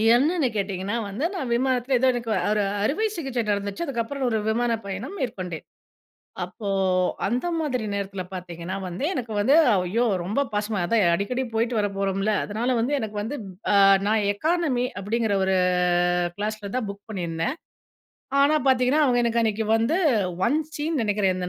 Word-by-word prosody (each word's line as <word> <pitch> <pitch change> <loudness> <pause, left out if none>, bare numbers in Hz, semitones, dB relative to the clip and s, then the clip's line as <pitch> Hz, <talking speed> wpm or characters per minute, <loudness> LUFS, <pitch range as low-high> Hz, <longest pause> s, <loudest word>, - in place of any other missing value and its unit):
என்னன்னு 300 +3 +2
கேட்டிங்கன்னா 195 0 -2
வந்து, 220 +10 -2
நான் 270 -10 -3
விமானத்தில 255 +1 +1
ஏதோ 260 - +3
எனக்கு 240 -2 -4
வரு - - 0
ஒரு 210 -1 +2 0.2
அறுவை 300 - +1
சிகிச்சை 270 -7 -2
நடந்துச்சு. 200 +8 -2
அதுக்கப்புறம் 265 0 -3
ஒரு 225 - +1
விமான 235 +2 +1
பயணம் 200 - -5
மேற்கொண்டேன். 185 - -4 0.8
அப்போ 180 +4 -7 0.6
அந்த 245 - -1
மாதிரி 260 -7 -1
நேரத்தில 195 -1 -3
பார்த்தீங்கன்னா, 175 0 -6
வந்து 180 +9 -5
எனக்கு 245 -7 -4
வந்து 260 +8 +4 0.2
ஐயோ 190 +6 +1 0.2
ரொம்ப 205 +9 -1
பாசமா 210 -1 -1
அதான் 225 +1 +2
அடிக்கடி 225 +9 -1
போய்ட்டு 230 +1 0
வர 205 - +1
போறோம்ல, 195 +2 0
அதனால 235 +5 -1
வந்து 250 +6 0
எனக்கு 215 -3 -5
வந்து 245 +8 -4 0.7
நான் 215 -1 +2
எக்கானமி 295 0 0 0.2
அப்படிங்கிற 220 0 0
ஒரு 190 0 +2 0.8
கிளாஸில 210 -1 -4
தான் 250 -4 -1
புக் 200 0 -9
பண்ணியிருந்தேன். 175 - -2 0.9
ஆனா 290 +2 +4
பார்த்தீங்கன்னா, 260 +3 +3
அவங்க 245 -2 +3
எனக்கு 235 0 +1
அன்னைக்கு 220 0 0
வந்து 230 +9 +1 0.5
ஒன் 295 - +2 0.2
சின்னு 305 0 -1
நெனைக்கிறேன். 205 -3 +1
225 Hz, 150 wpm, -24 LUFS, 200-255 Hz, 0.9 s, வந்து